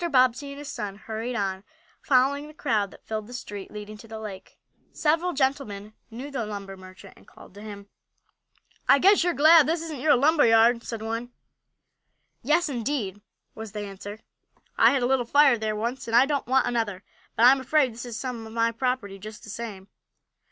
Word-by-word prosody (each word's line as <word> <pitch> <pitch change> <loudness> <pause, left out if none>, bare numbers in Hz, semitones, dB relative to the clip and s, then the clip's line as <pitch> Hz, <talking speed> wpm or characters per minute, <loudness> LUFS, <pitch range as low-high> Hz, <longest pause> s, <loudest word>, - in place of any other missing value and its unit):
Bobbsey 255 +1 +3
and 280 - -8
his 290 0 -8
son 200 -6 -5
hurried 225 +4 -5
on, 195 -4 -2 0.4
following 280 +2 +2
the 305 - -14
crowd 215 -10 0
that - - -18
filled 215 -1 -4
the 245 - -9
street 205 -5 -7
leading 210 0 -9
to 225 - -13
the 220 0 -8
lake. 200 -3 -9 0.3
Several 330 +4 +1
gentlemen 265 - -2 0.2
knew 250 +5 -8
the 260 -4 -2
lumber 200 -2 -6
merchant, 185 +1 -14
and - - -21
called - - -16
to 205 - -12
him. 205 -2 -9 1.0
"I - - +8
guess 390 +4 +5
you're 350 -1 0
glad 315 +1 +7
this 330 +1 0
isn't 315 -4 -6
your 290 +3 +4
lumber 290 +2 +4
yard," 230 +1 +5
said 230 -2 -6
one. 230 +2 -4 1.1
"Yes, 310 +7 +2
indeed," 235 -6 -3 0.3
was 220 -2 -9
the 210 - -4
answer. 205 +1 -8 0.6
"I - - +6
had 270 -3 +1
a - - +3
little 260 0 +2
fire 275 0 +4
there 215 -1 -2
once, 235 +5 -4
and 225 - 0
I 245 +3 +7
don't 280 -3 -2
want 265 +1 +3
another. 215 -5 -2 0.3
But 230 - +4
I'm 265 +2 +7
afraid 265 -1 +2
this 235 - -8
is 235 -3 -6
some 240 -4 -5
of 220 - -11
my 230 0 +1
property 230 -5 -2
just 215 +2 -10
the 215 - -9
same." 205 -4 -7
235 Hz, 195 wpm, -26 LUFS, 210-275 Hz, 1.1 s, I